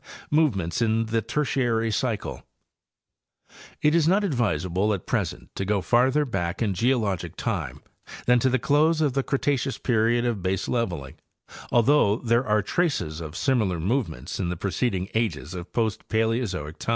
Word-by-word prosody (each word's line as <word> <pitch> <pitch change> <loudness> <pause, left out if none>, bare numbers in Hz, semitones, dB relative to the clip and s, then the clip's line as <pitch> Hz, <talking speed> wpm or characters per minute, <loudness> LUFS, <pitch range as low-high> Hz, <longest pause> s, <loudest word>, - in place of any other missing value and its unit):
Movements 120 - +1
in 115 0 +2
the 115 +1 0
Tertiary 120 -4 0
Cycle.—It 110 -1 -2 1.5
is 165 -2 +3
not 195 +4 +3
advisable 105 - 0
at 90 - -9
present - - -2
to - - -2
go 100 +1 +1
farther 130 +8 +3
back 85 -9 -3
in 105 -4 0
geologic 110 -3 0
time - - -3 0.4
than 125 0 +5
to 130 - +2
the 130 - +2
close 150 +5 +2
of 150 -4 +1
the 135 - +1
Cre 135 - -2
taceous 135 -2 0
period 120 0 +1
of 120 -3 0
baseleveling, 95 - -2 0.5
although 120 -3 +4
there 120 +1 +1
are 105 -1 +2
traces 120 - -1
of 80 0 -7
sim 135 -3 +2
similar 95 -6 0
movements 85 - -2
in 90 -3 -1
the 90 - -3
preceding 95 0 -1
ages 95 -8 -1
of 90 -1 -7
post 110 -4 -1
Paleozoic 110 -9 -1
time. - - -5
115 Hz, 155 wpm, -25 LUFS, 95-130 Hz, 1.5 s, than